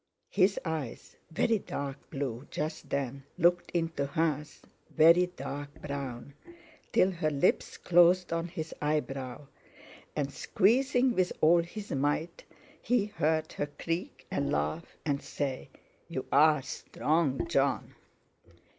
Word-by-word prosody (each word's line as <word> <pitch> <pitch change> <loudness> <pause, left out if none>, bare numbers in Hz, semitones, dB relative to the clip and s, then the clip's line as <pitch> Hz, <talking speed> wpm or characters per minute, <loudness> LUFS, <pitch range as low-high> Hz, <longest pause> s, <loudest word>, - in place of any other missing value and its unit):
His 195 0 +3
eyes, 155 -7 -4
very 215 +7 +2
dark 140 -5 -6
blue 135 -3 -4
just 155 +1 -4
then, 140 -1 -2
looked 175 0 +3
into 165 -5 -1
hers, 150 0 -1 0.3
very 170 +3 +6
dark 145 -5 -7
brown, 140 -2 -5 0.6
till 190 - +4
her 165 -4 0
lips 145 +4 +1
closed 175 0 +4
on 165 0 -1
his 160 -2 -6
eyebrow, 140 -3 -2 0.7
and, 140 -2 -2
squeezing 245 - +3
with 185 -4 +1
all 170 +2 +6
his 200 +5 -8
might, 145 +5 -1 0.4
he 240 -3 +2
heard 160 -6 0
her 145 - -2
creak 165 -3 -4
and 140 - 0
laugh, 75 +3 -2
and 140 -2 0
say: 135 -3 -4 0.4
"You - - -4
are 150 -1 +5
strong, 150 +2 -1
Jon!" 140 -4 +1
155 Hz, 120 wpm, -30 LUFS, 140-175 Hz, 0.7 s, very